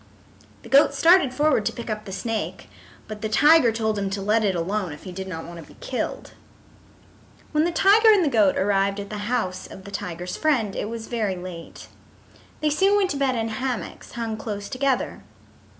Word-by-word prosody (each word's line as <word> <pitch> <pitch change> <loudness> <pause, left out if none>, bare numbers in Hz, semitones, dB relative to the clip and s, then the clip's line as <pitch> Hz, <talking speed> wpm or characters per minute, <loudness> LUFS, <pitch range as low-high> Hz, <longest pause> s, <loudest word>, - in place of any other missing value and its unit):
The - - -12
goat 280 +1 +5
started 330 -2 +5
forward 290 -3 +2
to - - 0
pick 235 - -8
up 215 -1 -4
the 195 - -8
snake, 190 -4 -4 0.4
but 215 -1 -8
the 220 - -2
tiger 295 +2 +5
told 220 -2 -1
him 200 -1 -2
to 195 +1 -4
let 215 +2 +2
it 195 -3 +1
alone 180 0 -2
if 145 - -12
he 185 - -8
did 190 +1 -6
not 165 -3 -6
want 170 0 -9
to - - -15
be - - -23
killed. 255 - -4 1.2
When 305 +1 +2
the 345 - 0
tiger 415 +6 +5
and 395 -5 +4
the 275 -5 -1
goat 205 -4 +4
arrived 195 0 +1
at 200 0 -7
the 210 +1 -4
house 200 -7 -2
of 190 - -12
the 200 - -10
tiger's 180 -2 -5
friend 250 -10 +1
it 210 - -3
was 230 -1 -6
very 220 -6 -2
late. 180 -2 -9 0.7
They 305 -1 +1
soon 390 +7 +3
went 390 -2 +1
to 285 - -2
bed 270 -2 +1
in 225 -1 -2
hammocks 250 +1 -5
hung 225 -2 -4
close 205 -2 -5
together. 270 0 -1
220 Hz, 205 wpm, -24 LUFS, 195-275 Hz, 1.2 s, goat